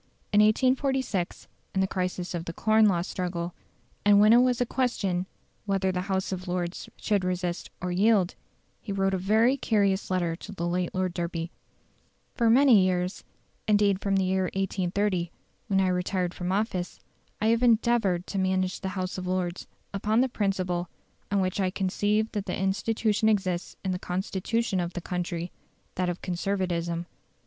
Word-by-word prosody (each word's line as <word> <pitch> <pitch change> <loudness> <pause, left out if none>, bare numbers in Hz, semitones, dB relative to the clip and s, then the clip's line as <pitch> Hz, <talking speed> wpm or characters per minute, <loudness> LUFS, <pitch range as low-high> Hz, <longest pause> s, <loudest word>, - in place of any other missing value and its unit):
In 205 - +6
1846, 255 -3 +1 0.3
in 190 - +2
the - - +3
crisis 185 -1 -3
of 170 -1 -3
the 165 - -5
Corn 220 +3 +4
Law 175 -4 +2
struggle, 175 -2 -3 0.5
and 205 0 +6
when 215 +2 +7
it 240 - +7
was 250 -1 +3
a 245 - +2
question 200 -8 -1 0.4
whether 195 -1 +1
the 180 0 -2
House 190 0 0
of 185 0 -5
Lords 175 0 -3
should 205 -3 0
resist 180 -1 -2
or 180 0 -3
yield, 195 0 +3 0.5
he 205 - -6
wrote 195 0 +1
a 190 - 0
very 220 +7 +3
curious 200 -5 +1
letter 175 -3 0
to 205 - -10
the 175 -3 -3
late 180 +1 -1
Lord 185 -1 0
Derby: 170 -1 -3 0.8
"For 235 -2 +2
many 240 -4 +6
years, 180 0 -1 0.4
indeed 205 -2 +3
from 195 -1 +1
the 190 - +2
year 190 0 +1
1830, 190 -1 0 0.4
when 195 -3 +2
I 190 -1 +3
retired 180 0 -1
from 180 0 -3
office, 190 -3 -2 0.4
I 220 - +2
have 230 +1 +3
endeavoured 225 -6 +3
to 195 - -3
manage 185 0 0
the 190 - -2
House 185 0 -3
of 185 - -5
Lords 180 -1 -2 0.3
upon 215 +4 +2
the 260 - +2
principle 185 -5 -1 0.4
on 200 -1 +2
which 185 +1 -1
I 190 -1 +2
conceive 205 +3 0
that 205 -2 -4
the - - -2
institution 215 +3 +1
exists 190 -4 -1
in 190 - +1
the 180 - -2
Constitution 190 +4 -1
of 175 0 -2
the 175 - -4
country, 175 -1 -3 0.4
that 180 -1 -1
of 175 - -5
Conservatism. 175 -2 -1
190 Hz, 170 wpm, -27 LUFS, 180-210 Hz, 0.8 s, when